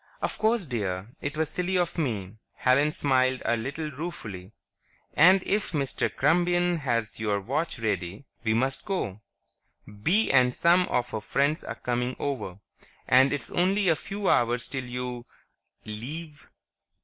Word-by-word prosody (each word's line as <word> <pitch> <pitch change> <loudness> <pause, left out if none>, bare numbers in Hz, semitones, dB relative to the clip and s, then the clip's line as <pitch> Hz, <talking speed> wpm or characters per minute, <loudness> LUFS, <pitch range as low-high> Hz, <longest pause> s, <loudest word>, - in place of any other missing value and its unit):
"Of - - -3
course, 220 -2 +2
dear; 100 -6 -3
it 145 +1 -4
was 160 -1 0
silly 180 +3 -1
of 175 -2 0
me." 105 - -2 0.2
Helen 140 +4 +3
smiled 130 -3 +1
a 120 - +3
little 140 +7 -4
ruefully. 110 - -7 0.6
"And 185 +4 +6
if 205 -2 0
Mr. 140 -3 0
Krumbein 175 +3 +2
has 115 -6 -1
your 105 -2 0
watch 140 - -2
ready, 100 0 -3 0.2
we 110 -1 +2
must 130 +3 0
go. 110 - -3 0.8
Bee 200 - +3
and 125 -2 +4
some 175 +2 +4
of 125 0 -1
her 110 - -3
friends 140 +8 0
are - - -5
coming 125 +1 -2
over, 130 -10 -3 0.5
and 130 +2 +6
it's 145 -4 -3
only 190 +2 +2
a 165 - +4
few 200 +5 -5
hours 120 0 +2
'till 130 -2 -4
you... 125 0 -5 0.6
leave." 145 +9 -7
135 Hz, 150 wpm, -27 LUFS, 115-165 Hz, 0.8 s, And